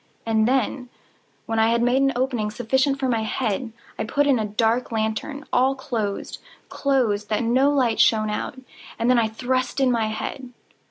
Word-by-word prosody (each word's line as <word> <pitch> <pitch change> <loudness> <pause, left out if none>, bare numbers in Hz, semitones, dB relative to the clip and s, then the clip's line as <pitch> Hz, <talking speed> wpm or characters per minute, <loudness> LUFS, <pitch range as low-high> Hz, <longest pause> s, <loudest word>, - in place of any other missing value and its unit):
And 220 -1 +2
then, 255 0 0 0.6
when 225 -1 -1
I 220 - +4
had 235 0 +2
made 250 +2 +3
an 275 0 +3
opening 245 -4 -1
sufficient 265 +5 0
for 265 - 0
my 230 -3 +1
head, 225 +1 -2 0.3
I - - 0
put 285 +6 +1
in 275 -4 +3
a 215 - -1
dark 225 +4 0
lantern, 225 +7 -3
all 260 +2 +3
closed, 230 -8 -4 0.3
closed, 230 -7 0
that 215 +2 0
no 255 +5 +3
light 255 -6 +1
shone 215 -1 +3
out, 210 - -4 0.4
and 235 +2 +2
then 250 - +4
I 225 - +2
thrust 255 +4 -2
in 265 -2 +3
my 230 -2 +1
head. 250 +3 -5
240 Hz, 180 wpm, -23 LUFS, 220-265 Hz, 0.6 s, I